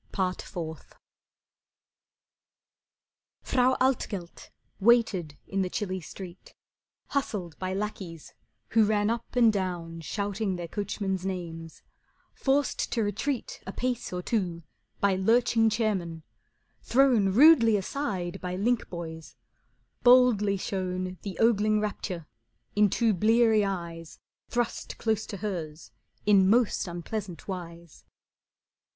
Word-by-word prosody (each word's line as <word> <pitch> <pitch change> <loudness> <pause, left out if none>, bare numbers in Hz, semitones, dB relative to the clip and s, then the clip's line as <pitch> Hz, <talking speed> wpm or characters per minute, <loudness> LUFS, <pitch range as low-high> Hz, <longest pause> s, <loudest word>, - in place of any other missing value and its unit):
Part 185 -1 -1
Fourth 160 -3 -7 2.5
Frau 255 0 +3
Altgelt 210 -9 -1 0.3
waited 195 -9 +3
in 195 0 -1
the 185 - -1
chilly 190 -2 -3
street, 180 +2 -10 0.5
Hustled 200 - -2
by 185 0 -2
lackeys 190 -5 -5 0.4
who 225 -1 +4
ran 210 0 +2
up 235 +1 -5
and 230 -3 +5
down 175 -4 -3
Shouting 200 +3 -2
their 175 -1 -5
coachmen's 195 -1 -3
names; 165 -4 -6 0.5
forced 275 0 0
to 230 - +1
retreat 220 +6 -3
A - - -3
pace 250 +2 -2
or 180 0 -4
two 180 -7 -1 0.4
by 200 -1 +3
lurching 225 +3 +3
chairmen; 195 -7 -1 0.6
thrown 245 -6 +4
Rudely 230 -1 +7
aside 195 -5 -3
by 180 0 -3
linkboys; 170 -7 -3 0.7
boldly 245 -5 +5
shown 185 -1 -3
The 195 -3 -6
ogling 215 -2 +3
rapture 195 -5 -4 0.5
in 210 0 +5
two 225 +2 +2
bleary 220 +2 +4
eyes 170 -4 -5 0.3
Thrust 240 -1 -2
close 220 -1 -1
to 200 - -6
hers 165 - -5 0.3
in 195 -2 +5
most 230 -2 +2
unpleasant 175 +2 -6
wise. 170 -4 -8
200 Hz, 110 wpm, -28 LUFS, 180-225 Hz, 2.5 s, Rudely